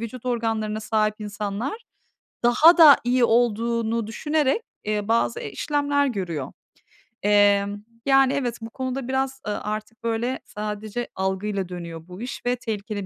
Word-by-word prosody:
vücut 230 +2 -7
organlarına 225 -3 -1
sahip 215 -1 +1
insanlar 210 - -4 0.6
daha 310 +9 +6
da 310 -4 +9
iyi 245 +1 +2
olduğunu 230 -1 +1
düşünerek, 295 - 0 0.2
eee, 210 -1 -1
bazı, 225 - +1
eee, 145 - -6
işlemler 285 - 0
görüyor. 175 - -3 0.7
Emm, 205 0 +3 0.2
yani, 270 -1 +5
evet, 250 -4 -1
bu 225 - -6
konuda 260 +1 -4
biraz, 265 0 -1
ııı, 210 - -2
artık 215 +2 -5
böyle 230 +3 -1
sadece 210 +3 -5
algıyla 190 0 -2
dönüyor 170 -2 -7
bu 180 +3 -10
iş 245 +1 -6
ve 245 0 +2
tehlikeli 210 -3 -4
225 Hz, 140 wpm, -24 LUFS, 205-255 Hz, 0.7 s, da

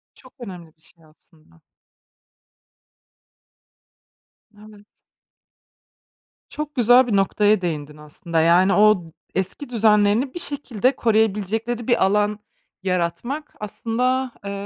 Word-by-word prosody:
Çok 255 -1 -19
önemli 180 -8 -10
bir 155 - -30
şey 165 0 -19
aslında. 155 - -26 3.0
Evet. 210 -1 -16 1.6
Çok 300 0 -6
güzel 245 +1 +5
bir 215 - 0
noktaya 205 +1 +2
değindin, 150 -3 -4
aslında. 150 +2 -4
Yani, 175 +4 +4
o 210 -3 +4
d 165 - -15 0.2
eski 190 +9 -3
düzenlerini 220 +2 +2
bir 350 - -5
şekilde 270 - -1
koruyabilecekleri 220 +1 0
bir 240 - +2
alan 210 +1 +1 0.4
yaratmak 190 - -3
aslında, 250 +4 -2
eee, 200 - -4
210 Hz, 100 wpm, -21 LUFS, 180-240 Hz, 3.0 s, güzel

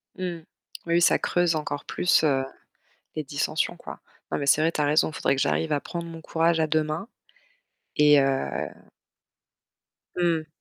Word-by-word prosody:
Mmh, 185 - -6 0.6
oui, 170 - -1
oui, 170 - +4
ça - - +4
creuse 175 -2 +1
encore 145 -2 -4
plus, 180 -2 +2
heu, 135 -3 +2 0.7
les 155 - -2
dissensions, 145 +3 -1
quoi. - - -10 0.3
Non, - - -1
mais 140 - -3
c'est 155 - +5
vrai, 165 +1 +2
tu 150 - -3
as - - +3
raison, 150 +2 +3
il - - -13
faudrait - - +1
que - - -2
j'arrive 160 +2 0
à 145 - +1
prendre 170 -1 -6
mon 165 -1 -9
courage 165 0 +1
à 160 - +3
deux 155 0 +2
mains 155 +8 -4 0.9
et 150 -1 +6
heu 135 - -1 1.5
Mmh. 170 -3 0
155 Hz, 180 wpm, -25 LUFS, 145-170 Hz, 1.5 s, et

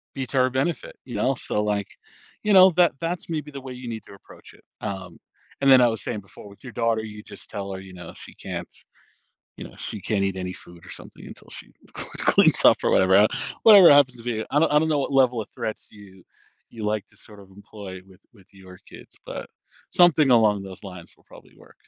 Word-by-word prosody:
be 135 - -3
to 135 - -4
her 130 0 +3
benefit, 135 +6 -3
you 120 - -8
know, 135 +1 0
so 105 - -3
like 105 -2 -2 0.6
you 210 -1 +2
know, 185 0 +8
that 175 0 +3
that's 170 0 -4
maybe 150 -2 -4
the 140 - -8
way 130 -1 -8
you 125 -1 -8
need 110 -1 -6
to - - -15
approach 100 - -17
it. - - -22 0.2
Um, 95 -4 -6 0.4
and 140 - +3
then 130 -1 +8
I 120 - +5
was 110 -2 -3
saying 105 - -4
before 95 +2 -15
with 100 - -18
your 125 - -9
daughter, 115 -1 0
you 105 -1 -9
just - - -14
tell 100 -2 -6
her, 95 - -7
you 95 -1 -13
know, 90 -2 -10
she - - -13
can't - - -7 0.9
you - - -9
know, - - -12
she 105 - -7
can't 100 0 -1
eat 95 -1 -2
any 90 -1 -5
food 85 -1 -15
or - - -12
something - - -12
until - - -14
she - - -12 0.3
cl - - -4
cleans - - +4
up - - +7
or - - +2
whatever, 95 0 +4
uh, 105 +2 +6 0.4
whatever 200 -7 +9
happens 140 -3 +5
to - - -12
be 115 -2 -3
I 145 - +3
don't 165 - +2
I 150 - +5
don't 160 +1 0
know 150 -2 +1
what 140 - -3
level 125 -3 +3
of 105 - -14
threats 110 - -6
you 95 -3 -16 0.5
you 110 -2 -8
like 105 -1 -2
to 105 - -25
sort 105 -1 -16
of 95 - -17
employ 100 -1 -11
with 95 0 -20
with 95 -3 -21
your 95 -1 -15
kids, - - -14
but - - -7 0.4
something 155 -5 +4
along 110 -4 +3
those 95 +1 -11
lines 90 -3 -11
will - - -30
probably - - -18
work. - - -19
110 Hz, 240 wpm, -23 LUFS, 95-135 Hz, 0.9 s, whatever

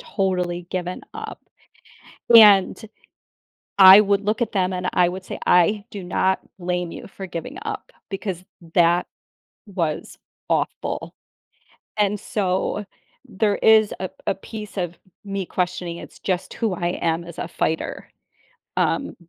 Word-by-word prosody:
totally 180 -3 -2
given 180 0 -3
up, - - -7 1.0
and, 205 -4 +7 1.0
I 190 +1 +11
would 200 -1 +2
look 215 +4 +1
at 230 - -1
them 190 -2 0
and 180 0 -2
I 180 -1 +4
would 185 +1 -6
say, - - -6
"I 200 +4 +4
do 200 -3 -6
not 190 +1 +1 0.2
blame 180 -1 -2
you - - -9
for 195 0 -8
giving 170 -2 -7
up, - - -6 0.2
because 190 -2 -4 0.3
that 175 0 +4 0.6
was 170 -6 -3 0.3
awful," - - -2 0.8
and 205 -1 +1
so, 195 +1 -1 0.4
there 205 +1 0
is 220 -1 +5
a 185 - -3 0.2
a - - +1
piece 210 +2 -9
of 175 -2 -3 0.3
me 195 -2 -4
questioning 180 -1 -2
it's - - -11
just 185 -2 -2
who 220 -5 -1
I 175 0 -1
am 165 +1 0
as 170 -1 -11
a - - -4
fighter, 160 - -2 0.7
um, - - 0
185 Hz, 135 wpm, -22 LUFS, 175-200 Hz, 1.0 s, I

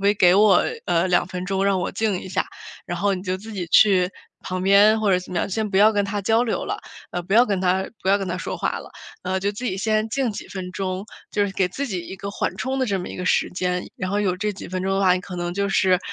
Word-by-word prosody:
可 200 - +4
以 205 - +4
给 180 -3 +5
我， 200 -2 +5 0.2
呃， 170 +2 +2
2 175 -1 +2
分 180 0 -5
钟， 195 +1 0
让 195 -1 +2
我 - - -2
静 205 -2 0
一 - - -8
下。 185 - 0 0.4
然 175 - -4
后 200 +2 +2
你 180 - -6
就 185 -1 -2
自 220 +4 -10
己 185 -4 -4
去 185 -3 +5 0.3
旁 185 0 -3
边， 205 +3 +5
或 210 -2 +2
者 185 - +4
怎 180 - -9
么 175 - 0
样 - - -1
先 215 +2 -1
不 190 - -1
要 215 +3 +6
跟 205 -1 +1
他 205 +1 -2
交 225 +4 +3
流 230 - -2
了， 410 +1 -3 0.3
呃， 175 - -3
不 180 - -6
要 235 +2 +7
跟 200 -4 0
他 185 +1 +1 0.2
不 190 - -2
要 195 - +5
跟 195 - -4
他 180 - -2
说 - - -4
话 - - -1
了， - - -11 0.3
呃， 185 +1 -1
就 200 +2 0
自 210 +5 -7
己 190 -6 -1
先 215 +2 0
静 260 0 0
几 205 - -7
分 185 -2 -6
钟， 185 +1 -3 0.3
就 205 - +2
是 200 - -3
给 190 -1 +1
自 275 +10 -4
己 185 -5 -2
一 - - -7
个 200 +2 -6
缓 - - -2
冲 265 +1 -2
的 260 - +2
这 195 -2 0
么 180 - -6
一 - - -7
个 180 - -4
时 - - +2
间。 180 0 -2
然 185 - -3
后 205 +1 +1
有 185 -3 0
这 210 +2 -1
几 195 - -9
分 185 0 -3
钟 195 - 0
的 195 - +1
话， 185 -2 +5
你 185 - -2
可 185 0 -9
能 175 0 -3
就 200 +1 0
是， 185 -1 +3
195 Hz, 315 characters per minute, -23 LUFS, 185-205 Hz, 0.4 s, 要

